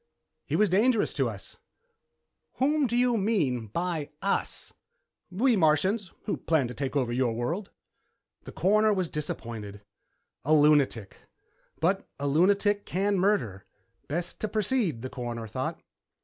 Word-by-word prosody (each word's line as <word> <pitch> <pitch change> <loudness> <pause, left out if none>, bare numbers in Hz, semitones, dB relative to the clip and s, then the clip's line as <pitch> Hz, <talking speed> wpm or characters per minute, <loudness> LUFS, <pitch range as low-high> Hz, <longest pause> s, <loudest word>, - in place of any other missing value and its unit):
"He - - -1
was 215 - +4
dangerous 215 +5 +2
to - - 0
us." - - -9 1.0
"Whom 290 +1 +2
do 240 +1 -1
you 245 -1 +3
mean 160 - 0
by 165 - -3
us?" 200 - -2 0.6
"We 230 +7 +2
Martians, 185 +4 +2
who - - -2
plan 155 -6 +1
to - - -6
take 135 +2 -4
over 130 -4 +1
your 125 -2 +1
world." 165 - -3 0.8
The - - -8
Coroner 215 +2 +3
was 185 -4 -1
disappointed. 110 -8 -5 0.6
A 155 +3 +4
lunatic. 145 -8 +3 0.6
But 190 +4 0
a 140 - -3
lunatic 200 +7 +3
can 195 +1 0
murder. 150 - 0 0.4
Best 170 +4 -4
to 215 - -1
proceed, 210 - 0
the 130 - -4
Coroner 120 -3 -5
thought. - - -4
175 Hz, 135 wpm, -28 LUFS, 130-205 Hz, 1.0 s, was